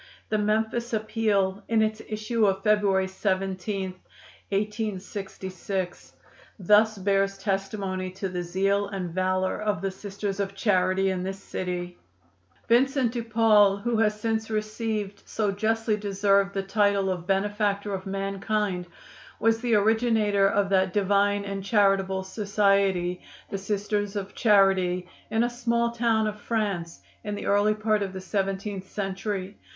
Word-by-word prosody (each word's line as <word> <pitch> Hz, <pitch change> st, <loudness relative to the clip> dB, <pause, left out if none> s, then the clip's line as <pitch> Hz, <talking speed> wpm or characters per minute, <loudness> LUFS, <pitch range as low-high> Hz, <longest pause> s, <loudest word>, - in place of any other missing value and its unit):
The 215 Hz, -, +1 dB
Memphis 220 Hz, +3 st, 0 dB
Appeal, 215 Hz, -3 st, 0 dB
in 225 Hz, -1 st, +3 dB
its 215 Hz, 0 st, -1 dB
issue 215 Hz, +1 st, +1 dB
of 195 Hz, 0 st, 0 dB
February 200 Hz, -3 st, +3 dB
17, 190 Hz, 0 st, -2 dB, 0.6 s
1866, 195 Hz, -3 st, -4 dB, 0.4 s
thus 210 Hz, +2 st, +4 dB
bears 195 Hz, 0 st, +1 dB
testimony 195 Hz, -1 st, -2 dB
to 195 Hz, +1 st, -3 dB
the 180 Hz, -1 st, -3 dB
zeal 195 Hz, +3 st, 0 dB
and 190 Hz, -4 st, -4 dB
value 185 Hz, +2 st, 0 dB
of 210 Hz, -3 st, 0 dB
the 195 Hz, -, 0 dB
Sisters 200 Hz, 0 st, -5 dB
of 195 Hz, 0 st, -2 dB
Charity 190 Hz, -2 st, +2 dB
in 185 Hz, -1 st, -2 dB
this 190 Hz, +1 st, -4 dB
city: 180 Hz, -2 st, -5 dB, 0.7 s
"Vincent 255 Hz, +1 st, +3 dB
de 240 Hz, -1 st, -3 dB
Paul, 215 Hz, -3 st, +4 dB
who 230 Hz, +3 st, -1 dB
has 210 Hz, -1 st, +2 dB
since 220 Hz, 0 st, -1 dB
received, 215 Hz, -1 st, -3 dB
so 210 Hz, -2 st, 0 dB
justly 220 Hz, +1 st, 0 dB
deserved, 200 Hz, -1 st, +1 dB
the 195 Hz, -, 0 dB
title 200 Hz, -1 st, +2 dB
of 180 Hz, -1 st, -5 dB
'Benefactor 205 Hz, +1 st, 0 dB
of 190 Hz, 0 st, -4 dB
Mankind,' 195 Hz, -1 st, -2 dB, 0.5 s
was 225 Hz, 0 st, +2 dB
the 240 Hz, -2 st, +2 dB
originator 215 Hz, -2 st, +3 dB
of 200 Hz, 0 st, +1 dB
that 190 Hz, -1 st, +2 dB
divine 205 Hz, 0 st, +2 dB
and 195 Hz, -1 st, -4 dB
charitable 195 Hz, -2 st, +2 dB
society, 195 Hz, -3 st, +1 dB, 0.3 s
'The 195 Hz, -, -2 dB
Sisters 205 Hz, +1 st, -2 dB
of 200 Hz, -1 st, -4 dB
Charity,' 190 Hz, -4 st, +3 dB, 0.2 s
in 220 Hz, +1 st, +2 dB
a -, -, +2 dB
small 235 Hz, -1 st, 0 dB
town 230 Hz, -2 st, +1 dB
of 210 Hz, 0 st, -4 dB
France, 200 Hz, -7 st, -2 dB, 0.2 s
in 210 Hz, 0 st, -3 dB
the -, -, -6 dB
early 205 Hz, +1 st, +3 dB
part 215 Hz, -1 st, +1 dB
of 195 Hz, -1 st, -3 dB
the 190 Hz, -, -6 dB
seventeenth 195 Hz, 0 st, -3 dB
century. 195 Hz, 0 st, -4 dB
200 Hz, 140 wpm, -26 LUFS, 190-215 Hz, 0.7 s, thus